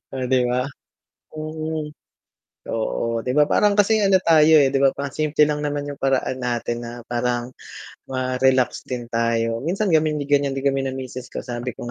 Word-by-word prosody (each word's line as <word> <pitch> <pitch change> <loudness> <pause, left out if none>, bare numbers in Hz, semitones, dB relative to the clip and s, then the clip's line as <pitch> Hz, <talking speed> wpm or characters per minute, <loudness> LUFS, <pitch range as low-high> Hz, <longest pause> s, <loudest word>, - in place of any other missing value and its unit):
Oh 130 -1 -3
'di 130 0 +2
ba. 125 +1 +1 0.7
Mm, 155 0 -4 0.9
oo, 115 +1 -1
'di 125 - 0
ba 150 - +6
parang 210 -1 +4
kasing 210 0 +3
ano 190 -1 +5
tayo, 160 -1 +6
eh, 140 -3 +5
'di 135 - +1
ba 135 -1 +3
parang 140 0 -4
simple 150 0 +3
lang 150 0 +1
naman 145 0 -2
'yung 140 - -8
paraan 130 -1 0
natin 120 -1 -2
na 120 0 -8
parang 120 0 -1 0.6
ma-relax 130 0 0
din 120 -2 -5
tayo, 115 0 0
minsan 195 +4 0
kami 155 -1 +3 0.2
ganiyan 140 -1 +2
din 135 - -4
kami 135 -1 +1
ng 130 - -3
misis 130 -1 -7
ko - - -7
sabi 120 -1 -5
ko 120 - -7
135 Hz, 180 wpm, -22 LUFS, 125-150 Hz, 0.9 s, ba